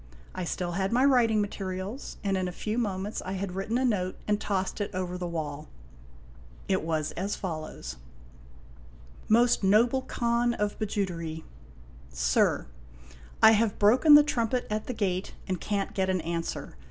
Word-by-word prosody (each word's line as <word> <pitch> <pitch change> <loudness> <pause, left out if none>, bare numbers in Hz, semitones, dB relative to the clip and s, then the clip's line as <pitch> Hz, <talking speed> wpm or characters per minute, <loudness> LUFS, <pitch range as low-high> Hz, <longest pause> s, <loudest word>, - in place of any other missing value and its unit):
I 185 - -4
still 175 +1 -3
had 190 +2 -1
my 250 +3 +4
writing 235 -6 +4
materials, 195 +4 -5
and 195 -1 +1
in 185 -1 -1
a - - -3
few 215 +6 -3
moments 200 -2 -2
I 190 - -5
had 195 0 -3
written 195 +5 -2
a 260 - +1
note 185 -6 0
and 210 0 +1
tossed 190 +1 -2
it 205 - -1
over 180 -1 -3
the 180 -1 -4
wall. 155 -3 -4 1.0
It 190 -1 +1
was 155 -1 -1
as 195 +3 -3
follows: 155 - -6 1.3
MOST 235 0 +4
NOBLE 235 +7 +4
KHAN 235 0 +1
OF 210 0 -2
BIJOUTERY. 170 -6 -3 0.6
SIR: 60 0 +1 0.8
I 220 - +10
have 220 -1 +2
broken 255 +9 +7
the 295 - +9
trumpet 245 -3 0
at 215 0 -2
the 250 - -2
gate, 190 -4 -2
and 185 -3 -2
can't 200 -1 -2
get 190 -2 0
an 185 -2 +1
answer. 165 - -4
195 Hz, 160 wpm, -28 LUFS, 180-220 Hz, 1.3 s, I